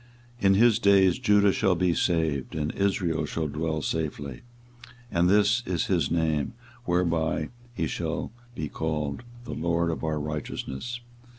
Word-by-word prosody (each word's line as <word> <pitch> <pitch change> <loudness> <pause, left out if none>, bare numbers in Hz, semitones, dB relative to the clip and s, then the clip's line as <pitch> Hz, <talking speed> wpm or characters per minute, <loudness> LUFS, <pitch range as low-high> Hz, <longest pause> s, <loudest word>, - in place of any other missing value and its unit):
24:023:006 100 - -3
In 95 - +6
his 115 +1 +5
days 100 -2 +5
Judah 105 -4 +4
shall 95 -1 +2
be 90 0 +2
saved, 80 -7 0
and 75 -1 -1
Israel 95 -4 0
shall 80 -1 -2
dwell 80 +1 -2
safely: 70 -5 -3 0.7
and 85 +1 +3
this 105 +4 +4
is 90 -2 0
his 90 -4 +1
name 80 -2 0 0.3
whereby 85 -4 +1 0.3
he 85 - 0
shall 75 - -3 0.2
be 75 - -3
called, 75 -2 -3 0.2
THE 120 - -6
LORD 85 +1 0
OUR 80 -1 -1
RIGHTEOUSNESS. 75 - -4
85 Hz, 140 wpm, -27 LUFS, 75-95 Hz, 0.7 s, In